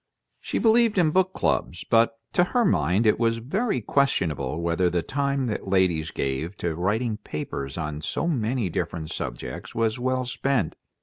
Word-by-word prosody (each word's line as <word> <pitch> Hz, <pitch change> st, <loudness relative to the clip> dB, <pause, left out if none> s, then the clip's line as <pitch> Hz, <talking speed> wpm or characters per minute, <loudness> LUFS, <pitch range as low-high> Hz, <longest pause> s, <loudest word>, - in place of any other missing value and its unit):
She -, -, -3 dB
believed 230 Hz, -1 st, +4 dB
in 165 Hz, -4 st, +4 dB
book 185 Hz, +2 st, +2 dB
clubs, 85 Hz, -, -1 dB
but 115 Hz, 0 st, +3 dB, 0.2 s
to 175 Hz, -, +4 dB
her 235 Hz, +6 st, +1 dB
mind 110 Hz, -, +2 dB
it 110 Hz, -, +3 dB
was 115 Hz, -1 st, +2 dB
very 145 Hz, -, -1 dB
questionable 85 Hz, -, 0 dB
whether 85 Hz, +1 st, +1 dB
the 85 Hz, -1 st, -1 dB
time 140 Hz, -, -1 dB
that 105 Hz, -4 st, -3 dB
ladies 90 Hz, -5 st, +2 dB
gave 70 Hz, +8 st, -3 dB
to 85 Hz, -2 st, -2 dB
writing 105 Hz, +7 st, 0 dB
papers 70 Hz, -7 st, -5 dB
on 75 Hz, -2 st, -4 dB
so 165 Hz, -, -1 dB
many 125 Hz, -, 0 dB
different 80 Hz, -2 st, -3 dB
subjects -, -, -6 dB
was 115 Hz, +1 st, 0 dB
well 130 Hz, 0 st, 0 dB
spent. 125 Hz, -5 st, 0 dB
110 Hz, 165 wpm, -25 LUFS, 85-135 Hz, 0.2 s, believed